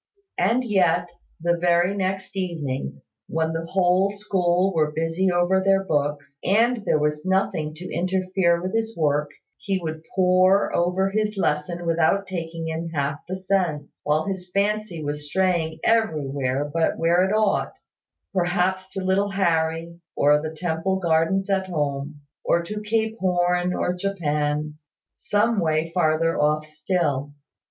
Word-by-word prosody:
And 250 +3 +2
yet, 175 -6 +2 0.3
the 170 +1 +1
very 175 +2 +2
next 190 0 -3
evening, 140 - -4 0.2
when 160 0 -1
the 165 0 -4
whole 185 +1 +3
school 190 -2 +1
were 155 -2 +2
busy 165 +4 0
over 175 +2 +2
their 195 0 +3
books, 145 -3 -2
and 225 +3 +2
there - - +3
was 150 0 -1
nothing 185 -5 0
to 180 +3 -8
interfere 185 -1 +1
with 185 +2 -4
his 225 -1 -1
work, 150 -2 +1 0.3
he 195 -1 -1
would 160 -2 -5
pore 185 +1 +4
over 185 +3 +1
his 210 0 -1
lesson 170 0 -1
without 170 +4 +2
taking 165 -3 -5
in 165 +1 -3
half 145 -2 -2
the 185 - -2
sense, 185 -6 -2
while 150 +1 +1
his 190 -2 -4
fancy 200 -3 -1
was 145 0 -3
straying 170 -2 0
everywhere 145 - +1
but 165 -1 +1
where 170 +2 +3
it 190 - 0
ought; 215 -1 +1 0.6
perhaps 185 +1 0
to 190 - -3
little 190 +2 +1
Harry, 170 -3 0 0.2
or 150 +1 +4
the 155 - -3
Temple 165 +3 -2
Gardens 170 +2 +1
at 190 -1 0
home, 145 -3 -3 0.2
or 170 - +2
to 210 +5 -5
Cape 220 +1 -1
Horn, 180 -1 +1
or 180 - 0
Japan 150 -5 -2 0.3
some 225 -1 +1
way 160 -1 0
farther 165 -1 +2
off 150 +1 +2
still. 155 -3 -2
175 Hz, 145 wpm, -24 LUFS, 155-190 Hz, 0.6 s, pore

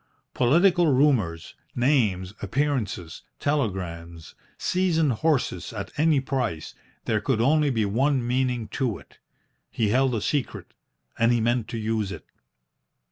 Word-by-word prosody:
Political 170 +7 +4
rumours, 125 - +1 0.2
names, 110 -8 +1
appearances, 110 - -2 0.2
telegrams, 90 - -3 0.2
seasoned 170 -5 +1
horses 140 +3 -1
at 95 -3 -6
any 155 -1 +3
price, 125 - -3 0.3
there 105 -2 0
could 115 +1 0
only 150 +5 +3
be 115 -5 0
one 130 +5 +1
meaning 125 -2 0
to 125 -7 -2
it. - - -19 0.5
He 110 -3 0
held 130 +2 +2
a 110 - -2
secret, 145 +2 -3 0.5
and 115 +1 +4
he 120 - +2
meant 120 0 0
to 115 - -5
use 110 -2 -2
it. - - -8
120 Hz, 130 wpm, -25 LUFS, 105-145 Hz, 0.5 s, Political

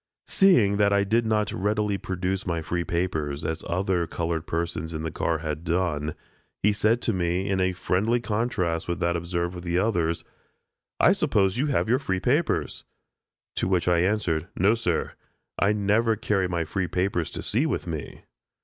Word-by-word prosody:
Seeing 120 - +4
that 100 -1 +3
I 100 0 +3
did 115 +3 +1
not 105 -1 +1
readily 105 0 0
produce 95 0 -3
my 85 -2 -1
free 85 +2 -1
papers, 80 -4 -2
as 80 0 -2
the - - -10
other 90 -1 0
colored 85 -1 -3
persons 80 -1 -3
in 80 - -4
the 80 - -3
car 85 +2 0
had 75 0 -4
done, 85 -3 -1 0.5
he 105 +1 +4
said 110 +3 +1
to 115 - +1
me 90 +1 0
in 95 -1 +1
a 95 0 +1
friendly 100 +6 +1
contrast 105 -7 -1
with 85 -1 -2
that 85 0 +1
observed 85 +1 -2
towards 90 -1 -8
the 85 +1 +1
others: 85 -5 0 0.8
"I - - +6
suppose 95 +2 +1
you 145 - +1
have 140 -5 +1
your 125 +3 +3
free 95 -9 -1
papers?" 125 - 0 0.7
To - - 0
which 90 -2 +1
I 90 -1 +4
answered: 90 -4 0
"No, 100 +5 +4
sir; 90 -8 -1 0.5
I 100 - +3
never 105 +2 +2
carry 100 -3 0
my 85 -2 -1
free 90 +3 -2
papers 90 -1 -1
to - - -6
sea 125 +9 +1
with 145 - -2
me." 80 -4 -6
90 Hz, 185 wpm, -26 LUFS, 85-105 Hz, 0.8 s, I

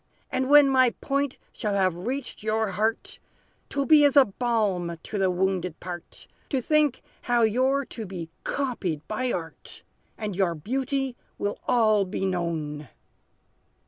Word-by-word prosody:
And 260 0 0
when 290 -1 +8
my 260 -3 +4
point 275 -1 -1 0.2
shall 210 -4 -2
have 190 -2 +2
reached 270 -1 -3
your 220 0 0
heart, 220 +3 -1 0.5
'T - - -8
will 280 - +2
be 305 -1 +7
as 285 0 +4
a 275 - +9
balm 200 -6 -1
to 210 - -4
the 190 -1 +3
wounded 180 -2 -1
part, 175 -1 -8 0.2
To 270 - +1
think 300 +1 +2 0.2
how 240 -1 +2
you're 260 +5 +2
to 225 -4 -7
be 170 -3 -7
copied 190 - -2
by 245 +4 -1
art, 165 -2 -6 0.3
And 210 -3 -4
your 180 -3 +1
beauty 265 - -2 0.2
will 205 0 -2
all 215 -4 +4
be 190 +1 -3
known!" 160 -5 -2
215 Hz, 150 wpm, -26 LUFS, 185-260 Hz, 0.5 s, a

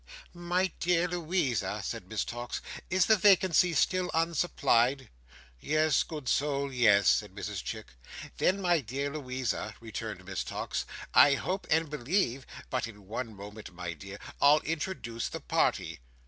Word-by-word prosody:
"My 175 +2 0
dear 175 0 +2
Louisa," 170 - -1
said - - -5
Miss - - -1
Tox, 120 +1 -5 0.3
"is 185 -1 +3
the 220 - +6
vacancy 185 -3 +4
still 185 +2 +2
unsupplied?" 140 -6 +2 0.5
"You 155 - +1 0.2
good 150 -6 -7
soul, 140 0 0
yes," 105 -6 +4
said 105 -3 +2
Mrs 105 -2 -5
Chick. 110 -1 -5 0.5
"Then, 195 +2 +2
my 175 -3 +3
dear 140 +3 -3
Louisa," 125 -7 -3
returned 110 -4 -6
Miss 95 -1 -3
Tox, - - -4 0.3
"I 140 - +7
hope 185 +9 -3
and 160 +1 +3
believe—but 135 - -2
in 105 -3 -13
one 115 +1 -5
moment, 100 -1 -10
my 90 -1 -4
dear, 100 +5 -9 0.2
I'll 145 +2 +6
introduce 155 -8 -3
the - - -5
party." 80 -1 0
140 Hz, 140 wpm, -30 LUFS, 110-170 Hz, 0.5 s, I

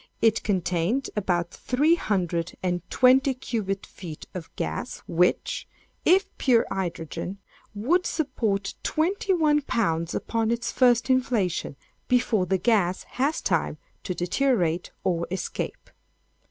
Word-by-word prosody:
It 225 -1 +3
contained 185 +5 0
about 175 -4 0
three 290 +6 +2
hundred 175 - -1
and 180 -1 0
twenty 260 +1 +4
cubic 205 -6 -3
feet 160 -5 -9
of 175 -3 -6
gas, 250 - -4
which, 180 +2 +1 0.4
if 380 +3 +3
pure 240 -4 +4
hydrogen, 180 0 -4 0.4
would 320 - +2
support 225 - -1
twenty 380 +5 0
one 305 -4 +3
pounds 170 - 0
upon 225 -1 -1
its 235 0 -1
first 245 0 +3
inflation, 235 - 0 0.3
before 235 -6 +2
the 190 - +2
gas 190 -4 +2 0.2
has 290 +4 +1
time - - 0 0.2
to 180 - -4
deteriorate 180 -3 +1
or 170 -2 0
escape. 190 +1 -4
215 Hz, 120 wpm, -26 LUFS, 180-260 Hz, 0.4 s, twenty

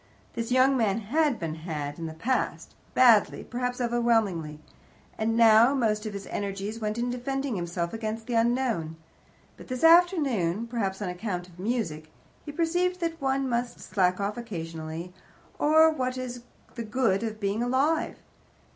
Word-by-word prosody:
This 230 0 -4
young 260 +2 +4
man 220 -5 +1
had 280 +5 +1
been 165 -2 -3
"had" 155 -2 -5
in 165 - -4
the 160 - -8
past 255 +11 -2 0.2
badly, 235 -5 +5
perhaps 250 0 -3
overwhelmingly 225 -10 0 0.6
and 225 +1 0
now 230 +3 +6
most 220 -4 0
of 210 - -5
his 200 0 -6
energies 200 +2 -4
went 215 0 -2
in 245 +1 -1
defending 270 +1 -2
himself 170 0 -3
against 225 0 -4
the 245 - -4
unknown. 230 -8 +1 0.6
But - - -12
this 255 +1 -4
afternoon 290 - +4
perhaps 210 -4 -3
on 185 - -2
account 180 -1 -4
of 175 -1 -18
music 185 -8 -2 0.3
he 295 - -7
perceived 355 +3 0
that 330 -2 -3
one 270 0 0
must 240 0 -2
slack 185 -2 0
off 200 +2 -2
occasionally, 165 -5 -6 0.5
or 315 +2 +6
what 255 -4 -2
is 250 -1 -5 0.3
the 235 - -5
good 215 -3 +1
of 220 -2 -4
being 200 +2 -1
alive? 275 +7 +1
230 Hz, 155 wpm, -27 LUFS, 190-255 Hz, 0.6 s, now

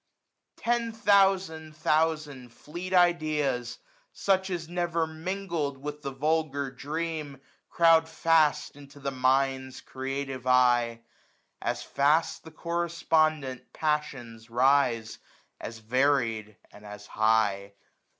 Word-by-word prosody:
Ten 235 -1 0
thousand 190 -7 +2
thousand 155 -5 0
fleet 170 +9 -8
ideas, 155 -9 +1 0.3
such 190 -1 0
As 175 -3 -4
never 170 -1 -1
mingled 160 -3 -4
with 150 +2 -7
the 140 - -4
vulgar 140 0 -1
dream. 150 0 -5 0.3
Crowd 165 -1 +4
fast 160 -3 +2
into 145 0 -14
the 140 0 -3
Mind's 130 0 0
creative 135 -1 -5
eye. 120 -2 +3 0.6
As - - -2
fast 150 +4 +1
the 160 - -11
correspondent 155 -5 -1
passions 130 -7 -3
rise, 120 -2 +2 0.4
1015 - - -6
As 115 - -9
varied, 115 -5 +1
and 105 - -15
as 105 0 -10
high. 105 -3 +1
145 Hz, 105 wpm, -28 LUFS, 130-165 Hz, 0.6 s, Crowd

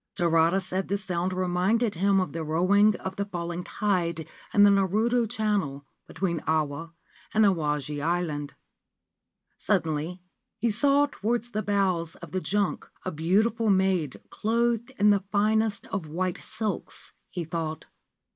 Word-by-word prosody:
Tarada 165 +1 +3
said 185 0 -3
the 200 - 0
sound 185 -2 -2
reminded 185 +5 +1
him 195 +3 +2
of 185 -6 -2
the 165 0 -3
roaring 190 +7 +3
of 190 +1 -6
the 200 - -1
falling 175 -2 -4
tide 170 -8 -1 0.2
in 205 - +5
the 205 - +7
Naruto 215 +4 +2
Channel 205 - -1 0.2
between 170 -4 -2
Awa 160 +1 -1 0.4
and 220 0 +6
Awaji 150 -5 0
Island. 155 -4 -1 1.0
Suddenly 160 +3 -1 0.4
he 235 - +1
saw 280 +6 +3
towards 240 -2 -2
the 215 - -1
bows 185 -6 0
of - - -11
the 185 - -1
junk 205 0 -1 0.2
a 185 - -1
beautiful 210 +8 +1
maid 190 -7 +1
clothed 235 +1 0
in 205 +1 +5
the 200 -2 +2
finest 215 0 +1
of 185 -5 -3
white 180 +3 -2
silks 215 -2 -5 0.2
(he 175 - -4
thought). 160 -1 -4
190 Hz, 140 wpm, -27 LUFS, 165-210 Hz, 1.0 s, the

